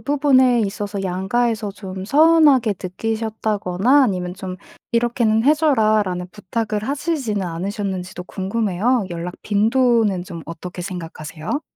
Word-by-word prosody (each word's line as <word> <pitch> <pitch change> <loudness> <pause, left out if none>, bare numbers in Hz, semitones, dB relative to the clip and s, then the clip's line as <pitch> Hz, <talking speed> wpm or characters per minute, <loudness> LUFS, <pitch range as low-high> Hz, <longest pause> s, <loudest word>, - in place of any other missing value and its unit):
부분에 260 -4 +3
있어서 200 -1 -3
양가에서 210 +4 -1
좀 190 -2 -7
서운하게 290 -4 +5
느끼셨다거나 220 +4 +1
아니면 180 -4 -2
좀 185 -1 -6 0.4
"이렇게는 230 -2 +2
해 300 +2 +6
줘라."라는 215 - +1
부탁을 210 +1 -3
하시지는 275 - -2
않으셨는지도 185 +1 -4
궁금해요. 205 +3 0
연락 175 +1 -5
빈도는 220 -2 +2
좀 165 -3 -8
어떻게 175 +2 -7
생각하세요? 170 - -5
210 Hz, 330 characters per minute, -20 LUFS, 185-240 Hz, 0.4 s, 해